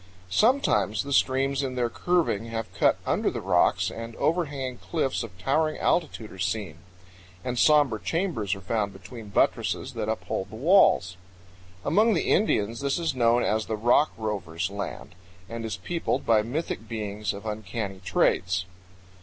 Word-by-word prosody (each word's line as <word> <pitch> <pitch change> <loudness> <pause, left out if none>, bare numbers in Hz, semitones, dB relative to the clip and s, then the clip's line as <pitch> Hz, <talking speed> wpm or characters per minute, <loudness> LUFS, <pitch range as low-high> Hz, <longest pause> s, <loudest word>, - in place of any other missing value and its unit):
Sometimes 110 - +2
the 140 0 -4
streams 135 +1 +2
in 130 -2 -3
their 125 -1 +1
curving 165 - 0
have 115 -1 -5
cut - - +3
under - - +1
the - - -4
rocks, - - +2
and 115 0 -7
overhanging 140 -7 -1
cliffs 150 -6 -1
of 105 -7 -8
towering 155 +11 +1
altitudes 145 -10 -1
are 95 - -12
seen; 95 -2 -2 0.7
and 125 -1 -2
somber 145 -8 +4
chambers 110 - -1
are 100 - -10
found 100 +1 -1
between 115 -4 -10
buttresses 100 - 0
that - - -3
uphold 95 - -3
the 110 - -10
walls. 120 - +4 0.7
Among 215 +8 +4
the 165 - 0
Indians 115 - +2
this 140 0 0
is 165 -4 -1
known 120 -1 +3
as 110 0 0
the 110 - -1
"Rock 120 +7 +3
Rovers' 95 -5 -3
Land," 100 -2 -6 0.3
and 115 0 -6
is 110 -4 -3
peopled 170 -1 -2
by 110 -2 +4
mythic 120 -1 -4
beings 105 -2 -3
of 100 +2 -9
uncanny 105 -2 -4
traits. 90 0 +1
115 Hz, 155 wpm, -26 LUFS, 100-140 Hz, 0.7 s, somber